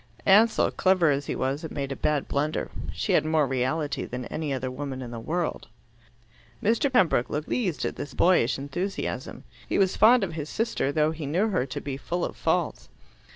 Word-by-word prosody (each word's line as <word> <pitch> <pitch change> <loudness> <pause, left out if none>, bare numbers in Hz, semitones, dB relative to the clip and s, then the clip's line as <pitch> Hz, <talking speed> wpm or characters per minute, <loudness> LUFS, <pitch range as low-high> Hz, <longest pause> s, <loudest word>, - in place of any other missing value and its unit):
Ansell, 215 +4 +5
clever 185 -4 +3
as 140 0 -1
he - - -2
was, 135 +3 -1
had 160 - -6
made 140 -1 -4
a - - -2
bad 150 0 0
blunder. 150 +2 -1 0.2
She - - -2
had - - +4
more 155 -1 +2
reality 135 +3 -1
than 125 0 -5
any 155 +2 -4
other 130 -1 -2
woman 135 0 -5
in 125 -2 -7
the 115 - -6
world. 165 +8 -3 1.0
Mr. 235 +6 +2
Pembroke 180 - +3
looked 150 +1 -2
pleased 190 -10 -1
at - - -3
this 145 - -6
boyish 170 -9 +3
enthusiasm. 175 +8 -4 0.3
He - - +1
was 190 -2 +2
fond 230 +2 +6
of 175 -4 -3
his 155 -2 -5
sister, 220 - -1
though 155 +1 +2
he 160 -3 -5
knew 185 +10 +1
her 180 -10 0
to 125 - -4
be 140 -2 -5
full 175 +6 -2
of - - -6
faults. - - -1
150 Hz, 200 wpm, -26 LUFS, 135-185 Hz, 1.0 s, fond